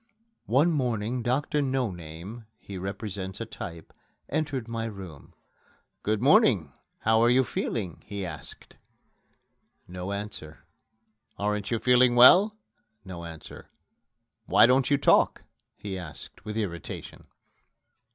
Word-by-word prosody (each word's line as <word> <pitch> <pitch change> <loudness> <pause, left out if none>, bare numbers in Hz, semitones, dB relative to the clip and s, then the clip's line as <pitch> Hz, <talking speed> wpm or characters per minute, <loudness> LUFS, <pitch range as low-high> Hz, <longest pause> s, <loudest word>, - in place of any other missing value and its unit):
One 140 +9 +3
morning 125 -4 -1
Doctor 145 +5 0
No 130 -5 0
name 85 +7 -9
(he 100 - -10
represents 95 0 -5
a 115 - -3
type) 85 -7 -9 0.4
entered 140 -6 -2
my 115 -1 -3
room. 95 -9 -9 0.7
"Good 110 +2 -1
morning! 130 - +4 0.3
How 110 0 +3
are 120 - +5
you 130 +2 +4
feeling?" 105 -7 -4
he 100 -3 -5
asked. 80 -4 -9 1.1
No 90 +2 -6
answer. 100 -6 -7 0.7
"Aren't 105 0 -2
you 115 - +1
feeling 125 +1 +4
well?" 190 - +7 0.5
No 85 -3 -7
answer. 80 -1 -11 0.8
"Why - - +6
don't 130 +1 +3
you 140 - +4
talk?" - - +3 0.3
he 95 -2 -6
asked 85 +3 -10
with 105 0 -4
irritation. 85 -7 -6
110 Hz, 120 wpm, -27 LUFS, 95-125 Hz, 1.1 s, well